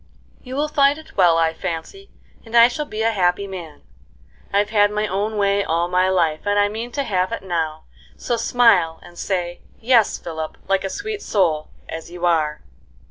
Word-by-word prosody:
You 255 0 -8
will 295 +2 0
fill 285 -1 +3
it 315 0 -14
well, 175 -3 +5
I 165 -1 +2
fancy, 175 - -6 0.3
and 230 0 -1
I 235 0 +9
shall 295 +4 -4
be 215 +1 -3
a 225 - +3
happy 185 -1 +1
man. 175 -6 -9 0.7
I've 205 +1 +1
had 205 -2 +4
my 210 +1 -1
own 210 +2 -2
way 200 0 +2
all 170 0 0
my 185 +1 +2
life, 165 -4 +1
and 205 0 +2
I 205 0 +3
mean 225 +3 -5
to 280 - -1
have 185 -6 0
it - - -4
now, 160 -4 -2 0.3
so 240 - -1
smile, 225 -9 +3
and 175 - -14
say, 175 -1 -3 0.2
'Yes, 230 -2 +3
Philip,' 160 -2 -6
like 195 0 +1
a 195 - -2
sweet 420 - -5
soul, 165 -7 0 0.2
as 165 0 -7
you 175 0 -4
are." 155 -3 +1
195 Hz, 190 wpm, -21 LUFS, 170-225 Hz, 0.7 s, I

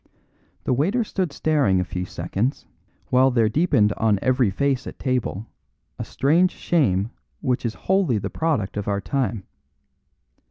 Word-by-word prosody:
The - - +1
waiter 190 - +1
stood 185 -6 -2
staring 140 -12 +2
a - - +1
few 90 0 -4
seconds, 95 +9 -3 0.5
while 130 +1 +5
there 115 -3 +2
deepened 110 -5 +2
on 110 -2 +2
every 125 0 +2
face 135 +5 -1
at - - -8
table 125 -5 -2 0.5
a - - -2
strange 165 +7 +2
shame 115 - +1 0.3
which 125 -1 0
is 110 - -5
wholly 190 - +2
the 100 - -4
product 140 -13 -1
of 105 - -3
our 100 -1 0
time. 120 -2 -2
125 Hz, 150 wpm, -23 LUFS, 105-145 Hz, 0.5 s, while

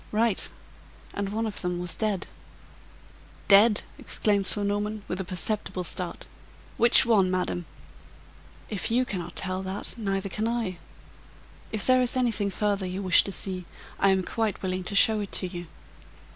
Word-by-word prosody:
"Right! 220 -1 +1 0.6
and 200 -1 -3
one 220 +3 -2
of 215 -2 -3
them 180 -1 -2
was 175 0 -3
dead." 210 -4 -1 1.2
"Dead!" 205 +2 +6 0.2
exclaimed 200 -3 0
Sir 205 - +4
Norman, 205 +1 -2
with 185 +1 -2
a - - -3
perceptible 185 0 -3
start. 175 0 -4 0.5
"Which 240 +2 +6
one, 205 -6 +4
madam?" 180 -2 -2 1.0
"If 205 -4 -2
you 250 +3 +2
cannot 180 -6 -5
tell 185 0 -1
that, 190 +1 -2
neither 195 -2 -1
can 215 +3 -2
I. 225 -7 -2 0.9
If 215 -3 -1
there 255 0 +5
is 250 +1 0
anything 220 -5 +1
further 200 -1 -1
you 185 +2 -4
wish 185 -2 +6
to 195 - -2
see, 185 -2 -4 0.3
I 195 - +4
am 190 -1 +2
quite 220 +1 -2
willing 185 0 -2
to 200 - -3
show 220 +1 +5
it 205 -1 -5
to 185 - +3
you." 175 -1 -7
200 Hz, 160 wpm, -27 LUFS, 185-215 Hz, 1.2 s, Dead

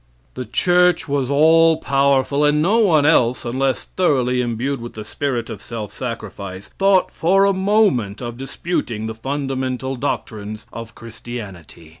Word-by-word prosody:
The 125 - -6
church 175 +9 +2
was 140 -3 -1
all 160 +3 +5
powerful, 140 0 +1
and 150 0 +3
no 195 +9 +3
one 165 -9 +4
else, 125 -6 +3
unless 130 +2 -1
thoroughly 125 -8 +1
imbued 120 +3 -2
with 120 - -8
the 110 -1 -8
spirit 120 0 -3
of - - -8
self 110 -3 -7
sacrifice, 100 -6 -7
thought 195 -1 +3
for 195 +4 +3
a 200 - +3
moment 190 - +1
of 120 -2 -6
disputing 130 -4 -4
the 110 - -4
fundamental 130 +1 -3
doctrines 110 -3 -4
of 115 0 -8
Christianity. 110 - -10
130 Hz, 145 wpm, -20 LUFS, 115-155 Hz, -, all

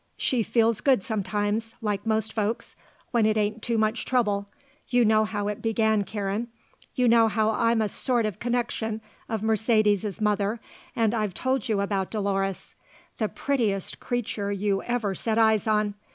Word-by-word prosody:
She 250 -3 +1
feels 225 -1 +2
good 260 -8 +3
sometimes, 210 +2 -2
like 210 -2 -2
most 220 0 0
folks, 220 +1 -2 0.4
when 230 -3 +3
it 215 0 +2
ain't 210 +1 0
too 235 +1 -1
much 220 +2 +1
trouble. 205 -5 0 0.4
You 245 -1 +3
know 215 0 +4
how 205 -1 -3
it 210 0 -3
began, 220 -2 +1
Karen. 205 +2 -3 0.5
You 250 -1 +3
know 230 -1 +6
how 220 +1 +1
I'm 230 0 +2
a - - 0
sort 240 +3 0
of 210 -5 -3
connection 235 -2 -1 0.3
of 220 -2 -2
Mercedes's 215 -2 +2
mother 210 +1 0 0.4
and 225 -1 +2
I've 210 -5 -1
told 260 -3 -1
you 205 -2 +1
about 195 -1 -1
Dolores. 195 -2 -2 0.5
The 215 -2 0
prettiest 225 -9 -1
creature 215 -4 -2
you 200 0 0
ever 235 -5 -1
set 220 +3 -2
eyes 220 -2 +3
on. 210 -1 +2
215 Hz, 165 wpm, -26 LUFS, 205-230 Hz, 0.5 s, know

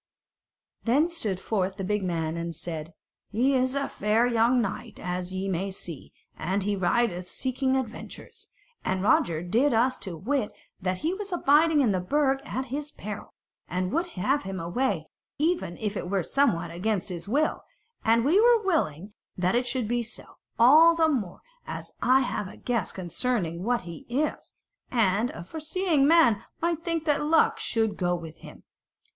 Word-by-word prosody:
Then 285 +8 +3
stood 215 - -3
forth 190 -2 -1
the 195 - -4
big 210 +1 0
man 165 -3 -1
and 170 0 -4
said: 160 0 -6 0.3
"He 250 +6 +2
is 260 0 +1
a 280 0 0
fair 215 +3 +1
young 240 +1 +3
knight, 225 -5 -4
as 180 0 -4
ye 190 +1 -3
may 190 +1 -1
see; 175 -6 -8 0.2
and 190 +4 -1
he 205 +1 0
rideth 185 -1 0
seeking 260 0 -1
adventures, 250 -4 -6 0.4
and 185 0 -1
Roger 170 -5 +2
did 230 +9 +2
us 250 +3 +2
to 175 -4 -5
wit 245 - -1 0.3
that 185 0 -1
he 335 - +2
was 400 0 -5
abiding 315 -2 +4
in 240 -6 +3
the 185 - +1
Burg 270 +7 +1
at 260 -1 -3
his 295 +1 -3
peril, 210 0 -8 0.3
and 185 +1 -2
would 340 +2 0
have 270 +10 +1
him 190 -1 -5
away, 175 0 -1 0.3
even 310 - 0
if 210 -1 -3
it 180 - -4
were 195 -2 +1
somewhat 175 - +1
against 195 +3 -1
his 175 -1 -6
will: 295 +8 +1 0.4
and 230 +1 +3
we 355 +9 +5
were 470 -1 +5
willing 205 - -1 0.2
that 180 0 +1
it 245 +1 +1
should 245 -2 0
be 240 +1 0
so, 235 - -8 0.3
all 310 +8 +7
the 325 -1 +3
more 215 - -2 0.3
as - - -6
I 260 +1 +5
have 210 -5 -2
a - - -11
guess 235 -7 -1
concerning 180 -1 -2
what 240 +2 +1
he 170 -2 -10
is; 290 +5 -2 0.4
and 225 -1 +2
a 170 - -8
foreseeing 315 - 0
man 265 -10 +5 0.2
might 335 -1 -1
think 335 -2 -2
that 295 -2 +2
luck 320 +2 +3
should 225 -2 0
go 175 -1 +1
with 165 -2 -9
him." - - -13
225 Hz, 175 wpm, -27 LUFS, 185-280 Hz, 0.4 s, all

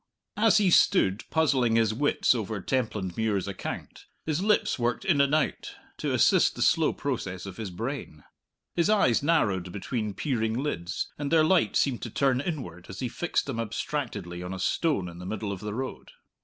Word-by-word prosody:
As 220 +1 +5
he 200 -4 +3
stood 105 - +4
puzzling 135 -8 +2
his 110 -1 +3
wits 145 +3 +2
over 110 -3 -3
Templandmuir's 105 -4 -1
account, 100 -1 -6 0.2
his 155 +1 -1
lips 210 -8 +2
worked 120 0 -1
in 155 -7 +4
and 140 +2 +3
out, 155 - -1 0.2
to - - -2
assist - - +4
the - - 0
slow - - +3
process 90 0 -4
of 95 -2 -8
his 110 -4 -4
brain. 100 - -5 0.5
His 170 +3 +2
eyes 200 - +3
narrowed 100 - +1
between 105 +1 -3
peering 110 -6 -1
lids, 90 -11 -3
and 145 0 -3
their 160 -1 +5
light 170 +2 +3
seemed 130 -4 +1
to 120 - -5
turn 130 +2 +1
inward 125 - -5
as 95 - -8
he 125 - -2
fixed 175 - -1
them 130 -5 -4
abstractedly 105 -6 -4
on 90 +1 -5
a - - -7
stone 145 - 0
in 85 0 -9
the 90 - -8
middle 105 0 -3
of 100 - -5
the 105 +1 -5
road. 130 +2 -5
115 Hz, 185 wpm, -27 LUFS, 95-145 Hz, 0.5 s, As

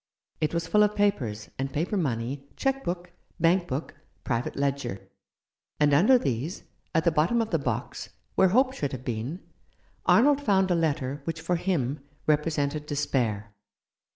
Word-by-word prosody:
It 155 - 0
was 170 -1 -1
full 210 +5 +3
of 210 0 +3
papers, 125 - 0
and 135 0 -2
paper 170 +8 -1
money, 135 - -2
cheque 270 0 0
book, 175 0 -4 0.3
bank 175 +2 +3
book, 135 +5 -4 0.3
private 120 -1 -2
ledger; 140 -8 -2 0.7
and 145 -1 +4
underneath 225 - +5
these, 140 +5 -2 0.3
at 160 - +3
the 170 - +3
bottom 160 +10 +2
of 225 -1 -1
the 165 - +2
box, 120 -5 -3 0.2
where 190 - +5
hope 255 +7 +3
should 145 - -3
have 130 0 -6
been, 125 - -3 0.7
Arnold 285 +4 +5
found 190 -7 +2
a - - +4
letter 145 -4 -1
which 165 -1 -3
for 170 +2 0
him 155 -6 -1 0.3
represented 150 -1 0
despair. 120 -8 -1
155 Hz, 155 wpm, -27 LUFS, 135-185 Hz, 0.7 s, underneath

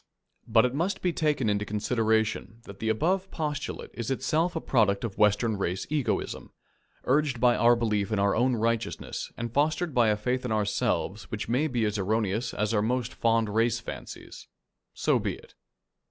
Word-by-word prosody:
But 115 0 +5
it 125 - -1
must 170 +8 -1
be 180 -2 +1
taken 150 -7 +1
into 105 0 +1
consideration 110 +1 0
that 100 -3 -11
the 110 - -1
above 185 - +1
postulate 150 -3 -4
is 115 -2 -4
itself 155 +7 0
a - - 0
product 110 -9 +2
of 110 -4 -5
Western 105 +1 +3
race 95 -1 -2
egotism, 150 -4 -2 0.5
urged 140 -2 +1
by 120 0 +4
our 120 +1 +5
belief 110 -3 0
in 110 - +1
our 100 0 +2
own 125 +2 +2
righteousness 115 0 -2
and 115 0 -4
fostered 155 +3 +1
by 120 -3 +4
a 105 -1 +2
faith 125 +4 -1
in 125 - -3
ourselves 105 -1 -1
which 105 - -4
may 130 +7 +1
be 120 -6 0
as 105 0 -1
erroneous 110 +3 0
as 105 +2 -1
are 105 - +2
most 125 +2 -1
fond 115 -2 +1
race 115 +1 +2
fancies. - - -9 0.5
So - - +2
be - - -2
it. - - -17
115 Hz, 180 wpm, -27 LUFS, 105-130 Hz, 0.5 s, But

